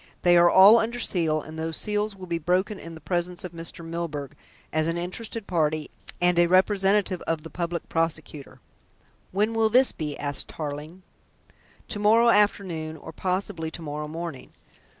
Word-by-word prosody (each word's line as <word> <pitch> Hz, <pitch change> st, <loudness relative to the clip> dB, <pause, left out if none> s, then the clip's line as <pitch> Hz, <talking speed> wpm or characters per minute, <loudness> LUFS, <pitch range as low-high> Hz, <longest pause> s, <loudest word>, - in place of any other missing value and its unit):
"They 175 Hz, -1 st, +5 dB
are 175 Hz, 0 st, +7 dB
all 200 Hz, +6 st, +8 dB
under 230 Hz, +2 st, -2 dB
seal, 165 Hz, -9 st, 0 dB
and 160 Hz, +1 st, -9 dB
those 160 Hz, 0 st, -3 dB
seals 210 Hz, 0 st, -2 dB
will 190 Hz, -1 st, -9 dB
be 170 Hz, -2 st, -2 dB
broken 185 Hz, +5 st, 0 dB
in 165 Hz, 0 st, -9 dB
the 160 Hz, -, -12 dB
presence 175 Hz, 0 st, -1 dB
of 180 Hz, -, -6 dB
Mr. 170 Hz, 0 st, -5 dB
Milburgh, 155 Hz, -4 st, -5 dB, 0.4 s
as 155 Hz, 0 st, +1 dB
an 165 Hz, +1 st, -1 dB
interested 205 Hz, +5 st, -4 dB
party, 155 Hz, -4 st, -1 dB, 0.3 s
and 175 Hz, 0 st, +3 dB
a 175 Hz, -, +5 dB
representative 190 Hz, 0 st, +3 dB
of 160 Hz, -2 st, -1 dB
the 165 Hz, -, -10 dB
Public 170 Hz, 0 st, -3 dB
Prosecutor." 160 Hz, -3 st, -3 dB, 0.7 s
"When 210 Hz, +4 st, +1 dB
will 225 Hz, -1 st, +2 dB
this 255 Hz, +4 st, +5 dB
be?" 150 Hz, -2 st, -5 dB
asked 145 Hz, -1 st, -2 dB
Tarling. 155 Hz, +4 st, -7 dB, 0.9 s
"To 225 Hz, -4 st, -3 dB
morrow 225 Hz, +3 st, +5 dB
afternoon, 185 Hz, -7 st, +1 dB
or 160 Hz, -, -10 dB
possibly 180 Hz, -1 st, -2 dB
to 165 Hz, +1 st, -7 dB
morrow 150 Hz, 0 st, -4 dB
morning. 160 Hz, -3 st, -7 dB
175 Hz, 170 wpm, -25 LUFS, 160-195 Hz, 0.9 s, all